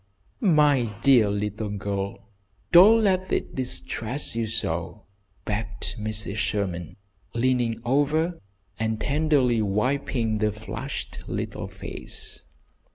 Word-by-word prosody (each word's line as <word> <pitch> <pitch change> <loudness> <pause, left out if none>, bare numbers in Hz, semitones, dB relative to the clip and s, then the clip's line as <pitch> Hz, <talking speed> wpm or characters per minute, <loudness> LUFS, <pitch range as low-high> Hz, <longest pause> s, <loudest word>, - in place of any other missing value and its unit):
"My 145 - +3
dear 125 -7 +6
little 105 +1 -2
girl, 100 +1 -4 0.4
don't 215 +6 +8
let 185 -2 +1
it - - -1
distress 125 0 -2
you 115 -1 0
so!" 105 -3 -3 0.4
begged 105 0 -2
Mrs. 110 -1 -2
Sherman, 95 -6 -2 0.4
leaning 120 -1 +1
over 150 +6 +1 0.4
and 110 0 -1
tenderly 140 -6 +2
wiping 110 +1 0
the 105 0 +2
flushed 105 +1 -6
little - - -4
face. - - -7
115 Hz, 100 wpm, -25 LUFS, 105-140 Hz, 0.4 s, don't